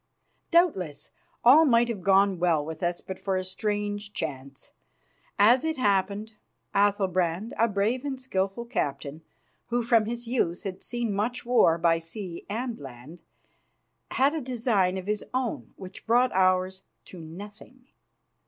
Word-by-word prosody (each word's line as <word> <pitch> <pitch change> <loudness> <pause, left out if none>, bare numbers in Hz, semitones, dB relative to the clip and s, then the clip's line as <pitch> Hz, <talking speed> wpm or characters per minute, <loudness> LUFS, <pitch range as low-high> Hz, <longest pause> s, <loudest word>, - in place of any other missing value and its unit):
Doubtless 195 - +1 0.3
all 275 +7 +8
might 240 -5 +4
have 225 -5 -4
gone 195 0 +3
well 165 -4 +2
with 160 +2 -7
us 175 -1 -1
but 190 - -7
for 195 -1 -1
a 185 - -1
strange 205 +1 -3
chance. 140 -3 -6 0.7
As 235 +5 +5
it 320 -1 -1
happened, 205 -1 0 0.4
Athalbrand, 195 0 +1
a 230 - +3
brave 215 +5 0
and 275 -2 -4
skilful 200 -2 -2
captain, 150 - -3 0.5
who 240 0 0
from 230 -2 +3
his 240 +2 -4
youth 205 -8 -1
had 190 -2 -6
seen 240 -3 -3
much 235 +5 -2
war 235 -9 +4
by 165 0 +2
sea 170 +1 -8
and 235 +3 -3
land, 135 +5 -11 0.9
had 275 +3 +2
a 320 - -2
design 225 -7 0
of 185 - -6
his 210 +1 -2
own 255 -2 -2
which 185 +3 -11
brought 245 +2 +4
ours 185 0 +2 0.2
to 185 - -11
nothing. 205 +10 -11
205 Hz, 145 wpm, -27 LUFS, 180-235 Hz, 0.9 s, all